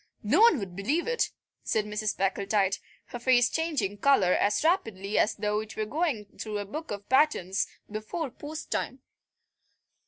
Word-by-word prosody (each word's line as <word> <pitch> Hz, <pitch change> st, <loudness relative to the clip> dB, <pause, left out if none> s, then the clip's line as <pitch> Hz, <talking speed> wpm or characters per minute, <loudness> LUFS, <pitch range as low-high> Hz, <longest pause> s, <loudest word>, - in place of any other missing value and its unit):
"No 285 Hz, -, +3 dB
one 460 Hz, -8 st, +7 dB
would 195 Hz, -6 st, -6 dB
believe 275 Hz, -, 0 dB
it," 480 Hz, 0 st, +1 dB, 0.3 s
said 215 Hz, -1 st, 0 dB
Mrs. 210 Hz, 0 st, -2 dB
Packletide, 195 Hz, 0 st, +1 dB, 0.3 s
her 245 Hz, -, -6 dB
face 245 Hz, -1 st, +4 dB
changing 280 Hz, -, -1 dB
colour 200 Hz, -11 st, +4 dB
as 205 Hz, +7 st, +2 dB
rapidly 220 Hz, -, +1 dB
as 220 Hz, -, +2 dB
though 210 Hz, 0 st, 0 dB
it 220 Hz, 0 st, -8 dB
were 215 Hz, -, 0 dB
going 275 Hz, -3 st, -1 dB
through 215 Hz, -1 st, -3 dB
a 205 Hz, -, -3 dB
book 310 Hz, +11 st, -6 dB
of 205 Hz, 0 st, -6 dB
patterns 260 Hz, -, +2 dB, 0.2 s
before 220 Hz, +8 st, -4 dB
post 300 Hz, +4 st, -8 dB
time. -, -, -2 dB
215 Hz, 160 wpm, -28 LUFS, 205-295 Hz, 0.3 s, one